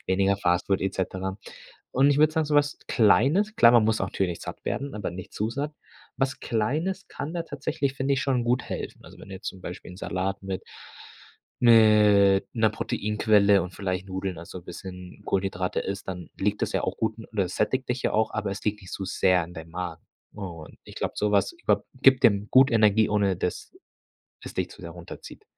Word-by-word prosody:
weniger 95 +1 +2
Fast 90 -2 +1
Food 95 -1 +1
et 95 - -2
cetera 95 0 -3 0.5
und 140 +2 +4
ich 145 - +2
würde 155 0 +5
sagen 160 -1 +1
so 150 - -1
was 145 0 +2
Kleines 145 - +3
klar, 115 0 +7
man 115 -3 +6
muss 110 0 +2
natürlich 95 -2 -2
satt - - -8
werden, 140 -2 -3
aber 105 -5 -3
nicht 90 +1 -9
zu 110 +2 -2
satt. 145 +4 -4 0.4
Was 135 0 -1
Kleines 155 - -1
kann 155 +4 -6
da 170 - -1
tatsächlich, 145 -4 -3
finde 140 +1 0
ich, 135 - -1
schon 125 -3 0
gut 125 +1 +1
helfen. - - -6
Also, - - -14
wenn - - -12
du 95 - -8
jetzt 95 - -6
zum 95 - -8
Beispiel 90 0 -8
'n 90 - -12
Salat 95 +2 -3
mit 95 -1 -4 1.0
mit 105 -4 +6
'ner 110 -2 +3
Proteinquelle 105 -1 +2
und 90 0 -7
vielleicht 95 -1 -3
Nudeln, 95 -2 -4
also 85 +1 -9
bisschen 90 0 -9
Kohlenhydrate 95 -1 -1
isst, 100 0 -5
dann 90 -2 -6
liegt 105 +1 -1
das - - -1
ja - - 0
auch - - -2
gut 110 -1 -1
und 115 - -10
das 95 -4 -1
sättigt 130 +4 0
dich 125 +1 -2
ja - - 0
auch, 110 0 +1
aber 105 -2 -2
es 100 0 -6
liegt 105 0 -1
nicht 90 - -11
so 95 - -4
sehr 90 -2 +2
in 85 - -12
deinem 80 -1 -9
Magen. 85 -1 -5 0.3
Und 85 -6 -9
ich - - -12
glaube, - - -2
so 105 0 +1
was 100 - +2
ich 345 0 -23
glaube, - - +2 0.2
gibt 135 -1 +5
dem 100 -1 +4
gut 130 +1 +6
Energie, 110 -1 +4
ohne 100 -3 +2
dass 90 - -4 0.7
es - - -9
dich - - -2
zu - - -13
sehr - - -7
runterzieht. - - -11
105 Hz, 210 wpm, -26 LUFS, 95-125 Hz, 1.0 s, klar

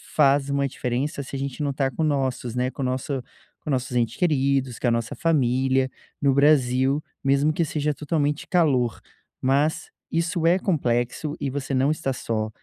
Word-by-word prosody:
faz 140 -1 +4
uma 140 0 +1
diferença, 130 +3 -2
se 135 - -8
a - - -3
gente 140 +1 -4
não 145 -1 0
tá 135 0 0
com 160 - -2
nossos, 130 -5 -1
né, 125 +1 0
com - - -7
o - - 0
nosso 130 +1 -2 0.4
com - - -8
nossos 130 -2 -1
ente 115 -1 0
queridos, 135 -6 +1
com - - 0
a - - +3
nossa 115 -1 -1
família, 130 -3 +2 0.3
no 140 -1 +3
Brasil 135 0 +3 0.2
mesmo 140 +3 +3
que 170 - +1
seja 150 -1 -1
totalmente 150 0 -1
calor, 130 - +2 0.4
mas 140 +4 +1 0.2
isso 165 +1 0
é 175 +2 +5
complexo 140 - -1
e 140 - -2
você 140 0 -4
não 135 +2 +3
está 155 -3 -2
só, 110 -3 -2
135 Hz, 180 wpm, -24 LUFS, 130-150 Hz, 0.4 s, é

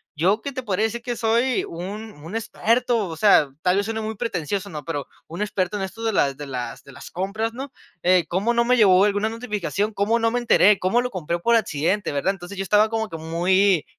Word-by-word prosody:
yo 190 +8 +2
que 280 - -4
te 255 -1 -5
podría 210 -1 -1
decir 235 +2 -3
que 240 0 -4
soy 235 +2 +1
un 205 +6 -7
un 175 +7 -7
experto, 230 -1 0
o 165 - -6
sea, 160 -7 +5
tal 180 +1 +3
vez 200 - +1
suene 220 0 -3
muy 220 0 -4
pretencioso, 200 -3 -3
¿no? 150 -4 -7
Pero 145 -4 -4 0.2
un 170 +5 -7
experto 205 -1 -1
en 195 - -3
esto 200 +4 -7
de 225 -1 0
las 140 -7 +1
de 145 - -7
las 125 -3 -5
de 140 - -14
las - - -11
compras, 205 +5 -3
¿no?, 265 +2 -7 0.3
eh, 180 -2 +4
cómo 200 +7 +1
no 235 0 +2
me 250 +1 +4
llegó 195 -3 +6
alguna 205 +1 +1
notificación, 215 -2 -3
cómo 215 +4 +1
no 230 - +2
me 245 - 0
enteré, 210 -4 +5
cómo 190 +7 +2
lo 250 - -3
compré 170 -2 -3
por 235 +6 +3
accidente, 190 -1 0
¿verdad? 145 +7 0
Entonces 190 +1 -10
yo 195 - -2
estaba 210 +3 +3
como 220 -2 -2
que 165 - -6
muy, 175 +2 +2
205 Hz, 230 wpm, -23 LUFS, 180-225 Hz, 0.3 s, llegó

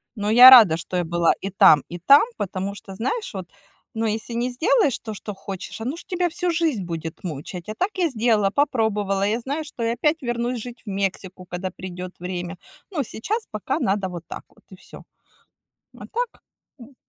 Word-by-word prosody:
Но 205 -1 -2
я 245 +4 +10
рада, 215 -11 +9
что 180 +2 -4
я 175 - +1
была 170 0 +2
и 195 - -3
там 155 -6 +6
и 175 +1 -7
там. 280 - +7
Потому 195 0 -3
что, 195 -1 -11
знаешь, 415 - -3
вот, 185 -3 -7 0.4
ну, 225 0 -2
если 220 +2 -3
не 240 +2 -1
сделаешь 330 - +2
то, 220 - -7
что 210 0 -7
хочешь, 195 +2 -8
оно 255 +7 -3
ж - - -11
тебя 360 -2 -1
всю 355 +1 -2
жизнь 320 - 0
будет 165 -1 -6
мучить. 170 +1 -6
А 215 - -5
так 370 - 0
я 360 -3 +2
сделала, 220 -4 +2
попробовала. 210 -7 0
Я 220 +3 0
знаю, 285 +6 -3
что 250 -5 -7
я 230 0 +1
опять 305 +4 0
вернусь 240 0 -2
жить 240 0 -10
в - - -7
Мексику, 190 -1 -3
когда 180 +1 -4
придёт 185 0 -8
время. 180 -1 -5 0.4
Но 305 -7 -1
сейчас 425 - -4
пока 215 -1 -2
надо 195 0 0
вот 175 -2 -7
так - - -8
вот - - -26
и - - -10
всё. - - -14 0.9
А - - -9
так, 480 0 -4 0.4
м. 255 +3 -14
215 Hz, 200 wpm, -23 LUFS, 185-260 Hz, 0.9 s, я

